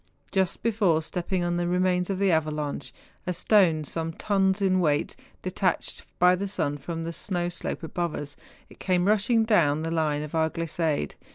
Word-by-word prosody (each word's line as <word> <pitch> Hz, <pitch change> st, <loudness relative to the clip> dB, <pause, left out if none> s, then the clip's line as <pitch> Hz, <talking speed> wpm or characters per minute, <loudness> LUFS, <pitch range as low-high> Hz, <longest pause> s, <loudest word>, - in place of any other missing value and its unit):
Just 190 Hz, -2 st, 0 dB
before 200 Hz, -8 st, +2 dB
stepping 180 Hz, +2 st, -2 dB
on 175 Hz, 0 st, 0 dB
the 175 Hz, 0 st, 0 dB
remains 180 Hz, 0 st, +1 dB
of 195 Hz, -, -1 dB
the 195 Hz, -1 st, +2 dB
avalanche, 150 Hz, -4 st, -1 dB, 0.4 s
a 180 Hz, -, 0 dB
stone 175 Hz, -6 st, +3 dB
some 165 Hz, +3 st, -4 dB
tons 195 Hz, +1 st, +1 dB
weight, 180 Hz, -6 st, +2 dB, 0.3 s
detached -, -, -1 dB
by 180 Hz, 0 st, +6 dB
the 200 Hz, +2 st, -3 dB
sun 145 Hz, -7 st, -2 dB
from 165 Hz, +3 st, -5 dB
the 165 Hz, +1 st, -4 dB
snow 175 Hz, -1 st, -2 dB
slope 175 Hz, -, -5 dB
above 170 Hz, 0 st, -2 dB
us, 145 Hz, 0 st, -6 dB, 0.4 s
came 180 Hz, -2 st, +1 dB
rushing 215 Hz, +2 st, +3 dB
down 160 Hz, -9 st, +3 dB
the 165 Hz, -, -2 dB
line 155 Hz, -3 st, 0 dB
of 150 Hz, -, -8 dB
our 160 Hz, -1 st, +2 dB
glissade. 160 Hz, -, -2 dB
175 Hz, 170 wpm, -26 LUFS, 155-190 Hz, 0.4 s, by